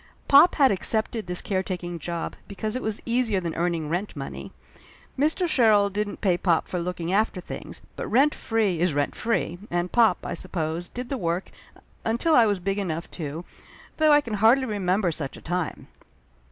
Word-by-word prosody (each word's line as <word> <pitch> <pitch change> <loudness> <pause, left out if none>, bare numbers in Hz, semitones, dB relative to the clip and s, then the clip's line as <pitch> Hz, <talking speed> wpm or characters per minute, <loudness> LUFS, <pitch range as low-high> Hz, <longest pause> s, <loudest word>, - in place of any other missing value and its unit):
Pop 285 +6 +7
had 275 -3 +5
accepted 220 +1 -1
this 180 0 +1
caretaking 180 -3 -3
job 170 +2 -4
because 215 +2 -4
it 255 - -2
was 220 -1 -3
easier 235 -4 +1
than 170 -3 -4
earning 170 -2 -1
rent 175 +6 -3
money. 135 -2 -7 0.6
Mr. 310 +6 +1
Sherrill 215 -9 +4
didn't 205 +1 -3
pay 180 -4 +2
pop 170 -4 +1
for 180 - -3
looking 175 0 -3
after 210 -2 +1
things, 180 - -8
but - - -5
rent 275 +6 +4
free 215 -7 0
is 175 -3 +1
rent 145 -1 0
free, 220 -6 -1
and 175 +1 -1
pop, 225 -7 +4
I - - -3
suppose, 165 0 -3
did 245 0 -6
the 270 - -2
work 170 0 -2 0.5
until 235 +9 +1
I 235 -6 +6
was 205 -2 0
big 195 +3 -2
enough 170 -4 -4
to, 160 +1 -6 0.5
though 310 -1 +4
I 295 0 +6
can 235 -6 -6
hardly 225 +6 +4
remember 195 -4 0
such 145 -4 -5
a - - -10
time. 180 -1 -3
195 Hz, 180 wpm, -25 LUFS, 175-225 Hz, 0.6 s, Pop